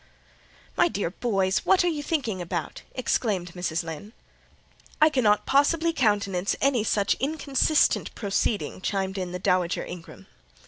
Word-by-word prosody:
"My - - +4
dear 205 - -2
boys, 195 -3 0
what 380 -1 +3
are - - +1
you 315 -4 -1
thinking 255 - -2
about?" 170 -1 -4
exclaimed 200 -8 -1
Mrs. 175 -2 -2
Lynn. 165 +7 -8 0.9
"I 310 - +6
cannot 220 -7 +2
possibly 320 +4 +2
countenance 200 - +1
any 265 -5 +2
such 205 -2 +1
inconsistent 290 +1 +1
proceeding," 200 -1 -1
chimed 190 0 -2
in 180 -1 -4
the 180 - -3
Dowager 180 -1 0
Ingram. 165 - -10
205 Hz, 135 wpm, -26 LUFS, 180-275 Hz, 0.9 s, I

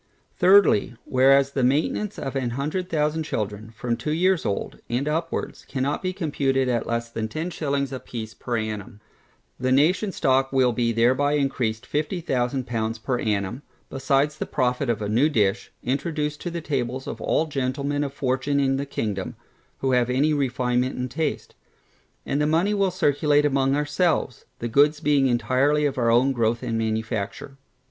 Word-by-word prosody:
Thirdly, 180 - +5
Whereas 135 +1 +4
the 135 -2 -1
maintainance 155 +10 0
of 135 0 -5
a 130 -2 0
hundred 150 +9 -3
thousand 155 0 0
children, 105 -6 -4
from 115 +1 -3
two 120 +5 -5
years 185 +2 +2
old, 100 - -3
and 125 +5 -1
upwards, 165 +2 -3
cannot 135 +2 -1
be 185 - -1
computed 140 -7 0
at 120 -2 0
less 115 0 -2
than 110 -1 -3
ten 160 +10 -4
shillings 140 -4 -1
a 130 - -4
piece 110 -3 -7
per 120 -2 -3
annum, 110 0 -5 0.6
the 130 +1 0
nationŌĆÖs 175 +9 +3
stock 135 0 +2
will 130 -2 +3
be 120 0 0
thereby 130 +6 +2
encreased 125 -6 -1
fifty 155 +5 -2
thousand 130 -4 -1
pounds 115 -2 -2
per 125 +2 -2
annum, 105 +3 -1 0.3
besides 135 +2 +1
the - - -3
profit 125 0 0
of 110 -2 0
a - - -2
new 120 +9 +3
dish, 105 -9 0
introduced 150 +3 -2
to 175 - -3
the 170 0 -4
tables 130 -3 -2
of - - -6
all 160 - +1
gentlemen 140 0 -2
of 140 - -3
fortune 135 +1 0
in 135 -1 +2
the 140 +1 -3
kingdom, 105 -8 -3 0.5
who 135 - +1
have 125 -1 +2
any 140 +5 +2
refinement 125 -2 0
in 125 0 -3
taste. 155 +5 -3 0.7
And 145 - 0
the 150 - +2
money 170 +7 +2
will 200 -2 +2
circulate 150 -4 +2
among 135 -1 +2
our 150 0 0
selves, 150 -4 0
the 120 - -4
goods 145 +5 +3
being 145 -2 +3
entirely 130 +5 +2
of 135 -2 -1
our 115 -1 +2
own 125 +4 +4
growth 115 -2 0
and 115 - -2
manufacture. 110 +3 -3
135 Hz, 175 wpm, -24 LUFS, 120-150 Hz, 0.7 s, Thirdly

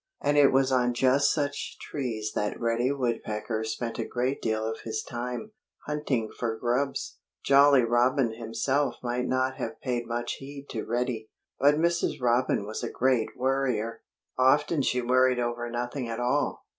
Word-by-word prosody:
And 145 - +1
it 145 -1 +6
was 135 0 +3
on 125 -1 +2
just 135 +3 +4
such 145 0 -2
trees 115 -7 -4
that 105 - -2
Reddy 120 +2 +1
Woodpecker 115 -4 -2
spent 115 +2 -4
a - - +1
great 125 +4 -2
deal 110 -1 -1
of 110 0 -3
his 110 -1 -4
time, 125 - -5 0.3
hunting 145 -7 -1
for 115 -2 -2
grubs. 125 +4 -1 0.3
Jolly 140 -1 +6
Robin 120 +1 +2
himself 125 +4 -1
might 125 +1 -1
not 130 0 0
have 150 - -5
paid 120 -3 -2
much 120 0 -3
heed 140 +1 -9
to 110 - -3
Reddy. 120 -2 -2 0.3
But 145 +2 +5
Mrs. 170 +2 +1
Robin 120 -4 +1
was 110 +1 -5
a - - -2
great 125 -3 +1
worrier. 125 -4 0 0.4
Often 145 +4 +4
she 125 -1 0
worried 130 +1 +3
over 120 0 -2
nothing 120 +1 -3
at 115 - -4
all. 125 +4 0
125 Hz, 160 wpm, -27 LUFS, 115-135 Hz, 0.4 s, it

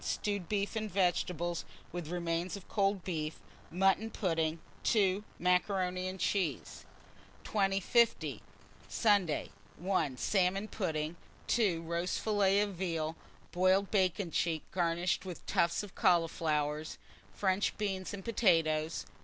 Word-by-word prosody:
Stewed 200 -5 -2
beef 205 +1 -1
and 215 -1 -2
vegetables, 175 -2 0 0.3
with 175 -2 -5
remains 170 +2 -2
of 195 - -13
cold 195 -2 +1
beef; 155 -4 -3 0.3
mutton 195 +4 +2
pudding. 165 -6 0 0.3
2. 200 -2 +2
Macaroni 180 0 +1
and 185 0 -5
cheese. 175 -7 -1 0.6
2050. 205 +3 +2 0.5
Sunday. 200 -8 +2 0.3
1. 170 -7 0
Salmon 195 +4 +1
pudding. 160 -6 -2 0.3
2. 190 -8 +1
Roast 170 +2 -1
fillet 205 -2 +3
of 205 -1 -1
veal, 165 -3 -2 0.4
boiled 185 +2 +3
bacon 185 -2 +1
cheek 160 0 0
garnished 175 0 0
with 185 -3 -8
tufts 170 +4 +1
of 205 - -10
cauliflowers, 160 -5 +1 0.3
French 190 0 0
beans 195 -3 -2
and 200 -1 -7
potatoes. 165 -8 +2
185 Hz, 115 wpm, -33 LUFS, 165-200 Hz, 0.6 s, fillet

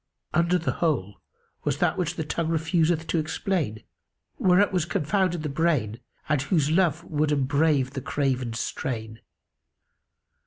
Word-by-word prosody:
Under 170 +2 +3
the 170 - -1
whole 105 - 0 0.4
was - - 0
that - - +2
which 175 -1 -2
tongue 165 +1 -1
refuseth 165 0 +1
to 165 - 0
explain, 155 - -2 0.6
whereat 190 +2 +4
was 180 -3 +2
confounded 175 +1 0
the - - -1
brain 140 -7 0 0.3
and 145 -2 +2
whose 150 0 +1
love 170 -2 +2
would 150 -2 0
embrave 140 -1 +2
the 135 - -5
craven's 125 -5 -1
strain. 110 -3 -4
155 Hz, 130 wpm, -26 LUFS, 135-170 Hz, 0.6 s, whereat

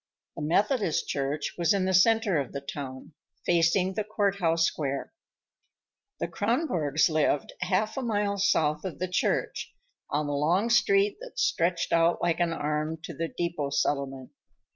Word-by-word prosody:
The - - -6
Methodist 195 - +1
Church 140 +2 -2
was 170 +3 +3
in 190 -2 +1
the 190 - 0
center 205 -2 +4
of 135 - -4
the 140 - -3
town, 140 0 -7 0.3
facing 175 +2 +2
the 215 +2 -1
court 205 -2 0
house 165 -3 +2
square. 140 -4 -3 1.1
The - - -1
Kronborgs 195 - +1
lived 155 -3 0
half 190 +6 0
a - - 0
mile 205 -4 -1
south 155 -5 +2
of 185 - -5
the 185 - -2
church, 180 - -1 0.4
on 150 +1 0
the 145 - -2
long 175 +11 +1
street 200 -3 +3
that - - -10
stretched 170 - +1
out 165 +1 +3
like 175 -1 0
an 170 -1 +1
arm 155 0 -2
to 165 - -6
the 165 +3 -3
depot 170 -4 -3
settlement. 140 -2 -1
170 Hz, 160 wpm, -27 LUFS, 150-200 Hz, 1.1 s, center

